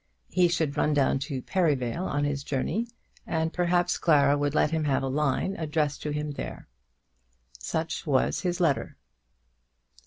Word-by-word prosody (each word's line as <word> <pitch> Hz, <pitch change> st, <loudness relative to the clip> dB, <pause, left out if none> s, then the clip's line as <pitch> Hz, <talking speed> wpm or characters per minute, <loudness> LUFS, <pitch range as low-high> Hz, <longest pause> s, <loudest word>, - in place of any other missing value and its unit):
He 180 Hz, -1 st, +4 dB
should 160 Hz, -4 st, -1 dB
run 150 Hz, 0 st, +2 dB
down 135 Hz, -1 st, +2 dB
to 130 Hz, -3 st, -4 dB
Perivale 160 Hz, -2 st, 0 dB
on 145 Hz, 0 st, -1 dB
his 145 Hz, -1 st, -1 dB
journey, 160 Hz, -, -1 dB, 0.4 s
and 160 Hz, 0 st, -1 dB
perhaps 175 Hz, 0 st, +1 dB
Clara 145 Hz, -3 st, +4 dB
would 145 Hz, 0 st, -1 dB
let 150 Hz, -, +3 dB
him 160 Hz, -1 st, 0 dB
have 135 Hz, -2 st, +1 dB
a -, -, -1 dB
line 150 Hz, +7 st, 0 dB
addressed 150 Hz, -2 st, -1 dB
to 150 Hz, -, -3 dB
him 150 Hz, 0 st, -2 dB
there. 140 Hz, -, -7 dB, 0.9 s
Such 160 Hz, -, -3 dB
was 135 Hz, -3 st, +2 dB
his 180 Hz, -1 st, -1 dB
letter. 160 Hz, -6 st, 0 dB
150 Hz, 155 wpm, -27 LUFS, 140-170 Hz, 0.9 s, He